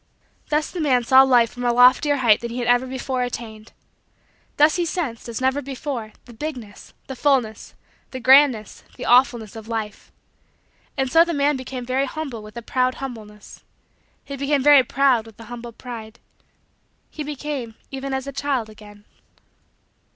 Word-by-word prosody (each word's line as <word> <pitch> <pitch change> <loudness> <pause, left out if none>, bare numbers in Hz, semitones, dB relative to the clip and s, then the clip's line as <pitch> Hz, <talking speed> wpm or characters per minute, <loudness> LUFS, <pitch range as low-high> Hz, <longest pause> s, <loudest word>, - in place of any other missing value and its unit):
Thus 300 0 0
the 360 - -6
man 255 -5 +2
saw 260 +3 +6
Life 245 -3 +4
from 245 - -8
a 240 - +2
loftier 250 +4 +5
height 235 -6 +3
than 235 - -5
he 235 - -6
had 245 - -2
ever 245 +1 +3
before 260 0 -3
attained. 225 -3 -6 0.9
Thus 300 +1 +5
he 350 - +1
sensed, 310 -10 -4
as 230 - -4
never 265 +2 0
before, 265 -5 -6
the 240 - -14
bigness, 240 -6 -8
the 265 - -7
fullness, 250 -6 0 0.3
the 260 - -7
grandness, 260 -4 +4
the - - -6
awfulness, 240 -3 +3
of 220 -1 -10
Life. 220 -2 -5 0.9
And 265 -1 -1
so 330 0 +7
the 340 -1 -3
man 285 +1 +2
became 255 -1 -6
very 260 +2 0
humble 270 -6 -6
with 215 +1 -12
a 235 - -6
proud 255 +2 0
humbleness. 215 -6 -10 0.6
He 280 - -6
became 280 0 0
very 290 -1 +7
proud 250 -3 +1
with 225 -1 -16
a - - -10
humble 240 0 -8
pride. 230 -1 -9 0.9
He 310 - -7
became 285 -5 -5 0.2
even 270 0 -5
as 265 0 -3
a 280 - -5
child 265 -5 -2
again. 205 -1 -15
255 Hz, 170 wpm, -22 LUFS, 230-275 Hz, 0.9 s, so